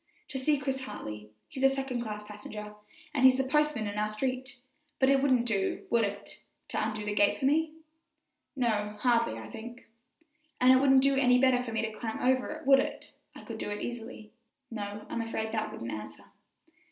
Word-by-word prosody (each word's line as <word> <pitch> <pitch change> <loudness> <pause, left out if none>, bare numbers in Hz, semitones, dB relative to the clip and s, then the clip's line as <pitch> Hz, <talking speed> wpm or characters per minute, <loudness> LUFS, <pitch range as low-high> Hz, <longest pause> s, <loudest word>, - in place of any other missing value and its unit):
"To 270 - -3
see 290 +3 +2
Chris 265 -1 -3
Hartley; 105 - -7 0.2
he's 265 - -7
a 270 - +6
second 270 -2 -2
class 210 -2 -5
passenger, 210 0 -8 0.4
and 275 -3 0
he's 260 0 +7
the 265 - +2
postman 300 -4 +1
in 205 0 -3
our 210 0 0
street; 260 +4 -3 0.4
but 265 0 +4
it 275 -1 +4
wouldn't 255 -4 +3
do, 200 -5 -1
would 235 -1 +4
it, 200 -1 -5 0.3
to - - -1
undo 215 -1 -3
the 210 - -1
gate 205 -1 +3
for 270 - -2
me?" 310 +3 +2 0.8
"No, 215 -5 0
hardly, 230 - +2
I 110 -1 -8
think," 235 - -9 0.7
"And 255 +1 +7
it - - +7
wouldn't 265 0 +5
do 275 0 +3
any 250 -2 +5
better 255 -1 +4
for 245 -2 -5
me 225 0 -1
to 220 - -2
climb 220 +1 -5
over 255 0 +2
it, 310 +1 -7
would 270 0 +7
it? - - -4 0.2
I - - -11
could - - -7
do - - -3
it 205 0 -4
easily." 230 -2 -7 0.4
"No, 210 -1 -5
I'm 235 - -3
afraid 220 -1 -3
that 220 -1 -2
wouldn't 115 0 -6
answer." 105 0 -8
240 Hz, 200 wpm, -30 LUFS, 210-265 Hz, 0.8 s, he's